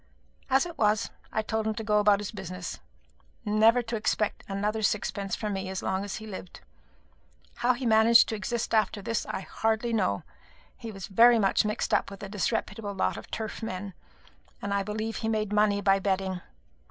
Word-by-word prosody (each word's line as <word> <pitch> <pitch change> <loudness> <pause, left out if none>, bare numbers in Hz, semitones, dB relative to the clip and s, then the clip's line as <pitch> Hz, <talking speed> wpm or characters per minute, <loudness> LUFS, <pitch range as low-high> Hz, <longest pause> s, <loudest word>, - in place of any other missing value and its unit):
As 265 +3 +4
it 340 -1 -9
was, 210 -1 +2 0.2
I 220 - 0
told 220 0 -1
him 220 - -1
to 225 - -4
go 210 -1 +3
about 205 -1 +4
his 205 - -5
business, 185 -3 -6 0.7
and 210 0 0
never 230 +3 +6
to 230 0 -4
expect 215 -1 -1
another 210 +2 -1
sixpence 200 -2 -1
from 210 -2 -3
me 190 -1 -3
as 190 0 -4
long 190 +1 -1
as 205 - -4
he 220 - -7
lived. 190 -3 -9 1.0
How 245 +1 +3
he 250 +1 -5
managed 230 +1 +6
to 220 - -1
exist 230 +2 -3
after 215 -2 +1
this, 230 +2 -2
I - - -3
hardly 225 +4 -1
know. 185 - +1 0.5
He 230 - -7
was 195 -3 -7
very 235 +4 +6
much 200 -1 +3
mixed 210 +2 -1
up - - +2
with 200 0 -10
a 195 - -6
disreputable 205 0 -2
lot 95 - 0
of 105 - -9
turf 220 0 -5
men, 195 -3 -5 0.7
and 200 0 -3
I 200 - +2
believe 215 +2 -3
he 220 - -2
made 215 -2 -1
money 210 -1 +3
by 195 0 +4
betting. 190 -2 -1
210 Hz, 195 wpm, -28 LUFS, 195-225 Hz, 1.0 s, never